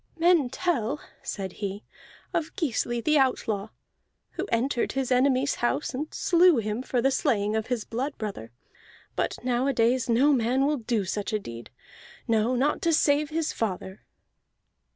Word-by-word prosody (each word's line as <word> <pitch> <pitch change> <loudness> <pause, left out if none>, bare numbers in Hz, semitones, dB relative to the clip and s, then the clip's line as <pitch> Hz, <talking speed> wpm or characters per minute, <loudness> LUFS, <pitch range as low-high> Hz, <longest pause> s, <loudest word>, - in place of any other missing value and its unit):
"Men 335 -5 +4
tell," 285 -4 -1 0.2
said 190 -2 -4
he, 200 +1 -4 0.5
"of 325 -1 -2
Gisli 240 -5 -1
the 305 -1 +4
Outlaw, 220 -6 0 0.6
who - - -4
entered 240 +1 0
his 265 -1 -2
enemy's 260 +2 +3
house 275 +5 0
and 295 +5 -4
slew 345 -3 +4
him 215 +1 -2
for 250 -2 -1
the 270 - +3
slaying 210 -5 +1
of 220 -1 -1
his 245 -4 -1
blood 265 +5 -3
brother. 195 - -6 0.6
But - - -1
nowadays 250 -1 +1
no 265 +6 +4
man 255 +2 +2
will 295 +1 +1
do 225 -4 -1
such 205 +4 -3
a 215 - +1
deed 115 - -9 0.6
no, 225 +2 +2
not 275 +4 +1
to 335 -1 +2
save 295 -1 +3
his 320 0 -1
father." 190 -2 -4
250 Hz, 150 wpm, -26 LUFS, 220-285 Hz, 0.6 s, Men